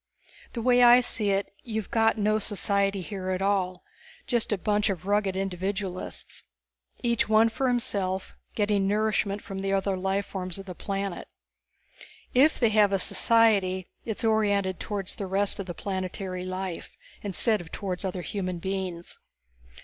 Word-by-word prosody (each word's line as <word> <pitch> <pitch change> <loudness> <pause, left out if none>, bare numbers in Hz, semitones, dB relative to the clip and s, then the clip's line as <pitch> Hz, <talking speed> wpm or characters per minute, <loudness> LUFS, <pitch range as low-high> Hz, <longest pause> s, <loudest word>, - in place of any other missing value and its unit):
The 235 - -4
way 245 0 +5
I 245 0 +9
see 230 -4 -1
it, 195 0 0
you've 220 -4 -4
got 225 0 +3
no 215 +1 +2
society 200 -1 +1
here 185 0 -5
at 185 0 -1
all, 185 -2 0 0.4
just 240 -3 0
a 210 - +2
bunch 210 +2 +1
of 185 -2 -3
rugged 200 -1 +1
individualists. 190 0 -4 0.6
Each 235 -3 +1
one 220 +1 +5
for 260 +4 -1
himself, 200 -7 -1 0.2
getting 205 -2 +1
nourishment 210 -1 0
from 195 -1 -6
the 195 0 -1
other 195 0 +1
life 190 +2 -1
forms 185 -2 -4
of 195 - -8
the 185 - -6
planet. 195 0 -4 1.1
If 285 +5 +4
they 235 - +4
have 210 -2 +4
a 195 - +3
society, 195 -3 +3
it 220 -3 -4
is - - -2
orientated 205 -4 +2
towards 200 -3 -3
the 200 - -5
rest 195 +2 +1
of 195 - -4
the 175 - -5
planetary 185 -1 -4
life 185 -1 -5 0.2
instead 205 +2 0
of 165 - -12
towards 185 -2 -3
other 185 -2 -3
human 185 -2 -3
beings. 185 -1 -4
200 Hz, 160 wpm, -27 LUFS, 185-215 Hz, 1.1 s, I